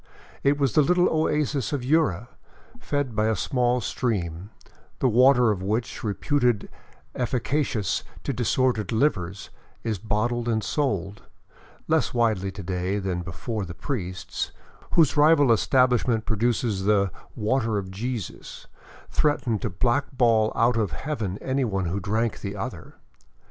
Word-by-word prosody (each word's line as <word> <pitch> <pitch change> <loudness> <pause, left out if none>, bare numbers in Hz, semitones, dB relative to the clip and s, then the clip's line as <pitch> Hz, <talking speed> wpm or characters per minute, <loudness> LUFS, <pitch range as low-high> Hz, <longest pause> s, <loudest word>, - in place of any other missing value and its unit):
It 140 +1 +3
was 140 -5 +1
the 155 - +5
little 180 +4 +3
oasis 150 -4 0
of 140 -4 -2
Yura, 130 - +2 0.5
fed 145 -5 -2
by 110 0 +2
a 110 - +2
small 125 +3 +1
stream, 95 -7 -2 0.5
the - - +2
water 125 0 +5
of 95 -3 -3
which, 110 +5 -2
reputed 120 +1 0 0.4
efficacious 125 - -1 0.2
to 140 - -2
disordered 120 -3 +1
livers, 100 - 0 0.3
is 110 -4 -2
bottled 115 +4 -1
and 110 -2 0
sold 105 - -1 0.3
— - - -26
less 160 -5 +1
widely 110 -5 +1
to 100 0 -8
day 90 +2 -2
than 95 -3 -2
before 100 +5 -4
the 85 -2 -7
priests, 95 - -4 0.4
whose 160 -3 +4
rival 145 -3 +5
establishment 125 -1 +3
produces 110 -2 0
the 100 -2 +3
" - - -28
Water 110 0 0
of 95 -2 -4
Jesus," 110 - -5 0.5
threatened 135 -8 +1
to 110 - -1
blackball 120 +1 +2
out 115 +1 +3
of 105 -8 0
heaven 105 - -3
anyone 125 -8 0
who 90 +4 -2
drank 110 +4 -1
the 100 0 -4
other. 100 - -6
115 Hz, 140 wpm, -25 LUFS, 100-130 Hz, 0.5 s, the